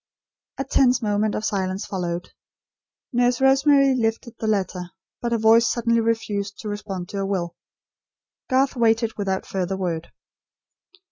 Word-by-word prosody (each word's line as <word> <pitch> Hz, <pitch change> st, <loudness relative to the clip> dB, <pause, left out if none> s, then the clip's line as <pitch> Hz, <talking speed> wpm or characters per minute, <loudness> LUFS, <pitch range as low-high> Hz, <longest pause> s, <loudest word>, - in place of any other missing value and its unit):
A 270 Hz, -, -1 dB
tense 255 Hz, -3 st, +2 dB
moment 210 Hz, 0 st, +1 dB
of 215 Hz, -, -3 dB
silence 190 Hz, -2 st, -2 dB
followed. 175 Hz, -2 st, -4 dB, 0.8 s
Nurse 245 Hz, 0 st, +2 dB
Rosemary 275 Hz, +1 st, +5 dB
lifted 225 Hz, -1 st, -1 dB
the 220 Hz, -, -2 dB
letter; 185 Hz, -4 st, -1 dB, 0.3 s
but 235 Hz, -, -2 dB
her 235 Hz, -, +2 dB
voice 225 Hz, +1 st, +5 dB
suddenly 230 Hz, -1 st, +1 dB
refused 205 Hz, -3 st, -2 dB
to 215 Hz, -, -5 dB
respond 205 Hz, -3 st, -5 dB
to 200 Hz, -, -5 dB
her 195 Hz, -, -1 dB
will. 175 Hz, -4 st, -2 dB, 0.9 s
Garth 265 Hz, +1 st, +2 dB
waited 230 Hz, -1 st, +2 dB
without 195 Hz, -2 st, -2 dB
further 190 Hz, 0 st, -2 dB
word. 170 Hz, -3 st, -3 dB
215 Hz, 140 wpm, -23 LUFS, 190-235 Hz, 0.9 s, Rosemary